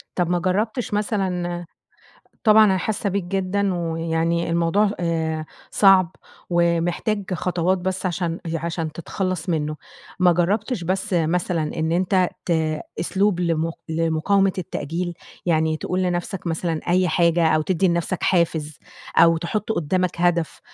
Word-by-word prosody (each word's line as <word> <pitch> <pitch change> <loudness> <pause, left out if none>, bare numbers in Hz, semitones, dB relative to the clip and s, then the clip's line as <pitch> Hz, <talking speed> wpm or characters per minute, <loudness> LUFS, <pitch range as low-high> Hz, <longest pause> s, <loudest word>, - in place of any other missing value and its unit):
طَب 175 -2 0
ما 175 0 +1
جرّبتش 210 +5 -1
مثلًا 180 -5 -1 0.8
طبعًا 215 -1 +7
أنا 190 -2 +3
حاسّة 205 +1 -2
بيك 195 -1 -1
جدًا 195 +1 -1
ويعني 165 0 -1
الموضوع 170 +5 +2
آآ 160 -2 -1 0.3
صعب 190 -4 +5 0.3
ومحتاج 175 +4 +1
خطوات 180 +1 0
بس 185 +1 -3
عشان 175 -1 -2 0.2
عشان 165 -1 -3
تتخلّص 180 +1 -3
منُّه. 155 -2 -1 0.4
ما 180 -1 +5
جرّبتش 200 +5 0
بس 190 +3 -2
مثلًا 165 -1 0
إن 160 +1 0
أنت 185 +1 +2 0.2
ت - - -1 0.5
أسلوب 195 +1 +1
لم 165 -1 0 0.2
لمقاومة 165 +4 +2
التأجيل؟ 175 0 -3 0.3
يعني 160 -2 +2
تقول 185 +3 -2
لنفسك 175 +1 -2
مثلًا 165 -1 -1
أي 185 +1 +3
حاجة، 170 -1 +3
أو 155 0 +3
تدّي 185 +3 +1
لنفسك 170 +1 -1
حافز، 160 -4 +1 0.4
أو 165 0 +6
تحُط 210 +6 -2
قُدّامك 175 0 -1
هدف 175 -2 +1
175 Hz, 130 wpm, -22 LUFS, 165-190 Hz, 0.8 s, طبعًا